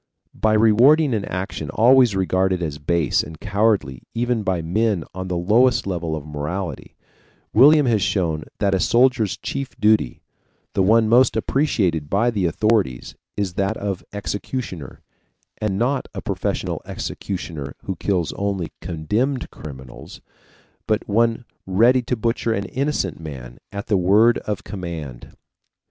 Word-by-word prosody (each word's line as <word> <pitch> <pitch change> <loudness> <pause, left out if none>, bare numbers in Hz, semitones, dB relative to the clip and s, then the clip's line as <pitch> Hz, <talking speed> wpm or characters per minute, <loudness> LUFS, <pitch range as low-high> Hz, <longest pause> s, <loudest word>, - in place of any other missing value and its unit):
By 110 0 +1
rewarding 120 +7 +5
an 105 -3 -1
action 90 -5 -4
always 120 - +5
regarded 95 -1 +1
as 75 -2 -4
base 80 -1 +1
and 80 0 -10
cowardly 100 - 0
even 120 -1 0
by 95 -5 -1
men 105 +1 0
on 95 0 -5
the 90 -1 -2
lowest 115 +8 +3
level 85 -4 -2
of 75 -2 -7
morality, 75 +5 -5 0.6
William 145 +5 +7
has 115 -4 +2
shown 80 -6 0
that 100 -2 +1
a 95 - +2
soldier's 120 -2 +2
chief 135 -2 -5
duty 105 - +2 0.5
the - - +1
one 110 +3 +4
most 120 +3 +4
appreciated 95 - 0
by 115 +5 +2
the 100 -6 0
authorities 95 - 0 0.2
is 100 -4 -1
that 100 +4 -1
of 100 -3 -4
executioner; 100 - -5 0.6
and 105 -3 -1
not 130 +5 0
a - - -4
professional - - -2
executioner 80 -7 -5
who 95 - -3
kills 90 -2 -1
only 100 -4 -3
condemned 105 - -2
criminals, 65 -5 -10 0.7
but 110 0 0
one 115 +3 +1 0.2
ready 115 +7 +4
to 125 +1 -2
butcher 115 0 -1
any 100 -1 -4
innocent 140 +3 -2
man 65 -7 -9
at 100 0 -5
the 105 - +2
word 105 +6 +4
of 105 -2 -4
command. 80 - -7
100 Hz, 140 wpm, -21 LUFS, 85-115 Hz, 0.7 s, William